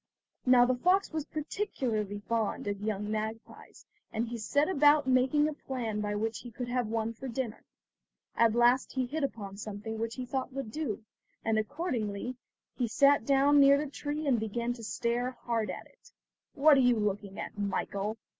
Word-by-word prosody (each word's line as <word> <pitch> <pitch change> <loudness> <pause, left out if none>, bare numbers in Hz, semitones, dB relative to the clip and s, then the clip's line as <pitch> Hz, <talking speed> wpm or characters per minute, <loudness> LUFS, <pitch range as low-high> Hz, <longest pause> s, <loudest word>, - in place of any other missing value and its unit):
Now 250 -1 +7
the 255 - +2
fox 360 +10 +2
was 310 -2 -2
particularly 240 - -3
fond 225 -2 -1
of 205 -1 -3
young 210 -1 -2
magpies, 220 +1 -6 0.3
and 230 +1 -1
he 240 - -4
set 285 +7 +1
about 295 -4 +5
making 260 +3 +3
a 305 - -2
plan 235 -7 -4
by 210 0 -2
which 220 +1 -2
he 245 - -9
could 240 +2 -6
have 245 -2 0
one 225 +1 -1
for 265 +4 -8
dinner. 240 -2 -4 0.7
At 230 -1 +4
last 240 +2 +3
he 260 -1 0
hit 295 +5 -3
upon 200 -7 -4
something 215 +1 -6
which 230 0 -3
he 255 - -4
thought 260 +1 -3
would 270 -5 -5
do, 235 -7 -3 0.4
and 220 -1 +2
accordingly 235 - -3 0.4
he 245 - 0
sat 280 +2 +4
down 280 +1 +5
near 280 0 +7
the 290 -1 -3
tree 295 +1 -4
and 260 -5 +3
began 235 +3 -2
to 235 -2 -11
stare 240 +3 -1
hard 225 -4 -1
at 185 - -6
it. - - -22 0.4
"What 295 0 +6
are - - +5
you 245 -1 +4
looking 205 -2 -2
at, - - -6
Michael?" 205 +1 -2
240 Hz, 185 wpm, -30 LUFS, 215-275 Hz, 0.7 s, Now